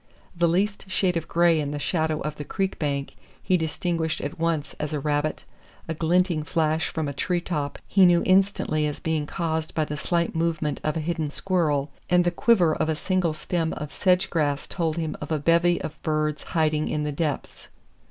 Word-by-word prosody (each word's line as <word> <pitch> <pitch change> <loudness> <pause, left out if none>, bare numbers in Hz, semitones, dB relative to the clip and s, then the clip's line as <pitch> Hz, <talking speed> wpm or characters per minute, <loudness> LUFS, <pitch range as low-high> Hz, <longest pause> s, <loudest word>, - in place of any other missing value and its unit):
The 170 0 +3
least 195 +3 0
shade 185 -1 +1
of 165 -1 -2
gray 170 -1 +3
in 145 -2 -1
the 145 - -3
shadow 160 0 0
of 150 0 -4
the 145 - -4
creek 190 +6 -2
bank 140 -2 -2 0.3
he 185 - +2
distinguished 160 0 -1
at 145 - -5
once 165 -3 -1
as 150 0 -3
a 150 - 0
rabbit, 145 +1 -1 0.4
a 160 - -2
glinting 170 +1 +2
flash 155 0 0
from 160 -2 -2
a 140 - -3
tree 175 +6 0
top 150 -5 -3
he 195 - +4
knew 175 -1 +4
instantly 185 -5 +2
as 150 - -4
being 155 -2 -1
caused 160 -1 -2
by 155 - +1
the 150 0 -5
slight 170 +2 0
movement 160 -3 0
of 155 +2 0
a - - -1
hidden 160 -1 -2
squirrel, 150 -5 0 0.2
and 180 0 +5
the 175 - +1
quiver 175 -3 +3
of 155 - -1
a 160 - +1
single 180 -1 0
stem 165 0 -1
of 150 -2 -6
sedge 185 0 +2
grass 145 -3 0
told 165 -3 -2
him 160 -2 -2
of - - -6
a 155 - +2
bevy 170 +3 +3
of 155 - -7
birds 155 -1 0 0.2
hiding 155 -1 +2
in 150 - -1
the 150 - -1
depths. 145 0 -3
160 Hz, 200 wpm, -25 LUFS, 150-175 Hz, 0.4 s, and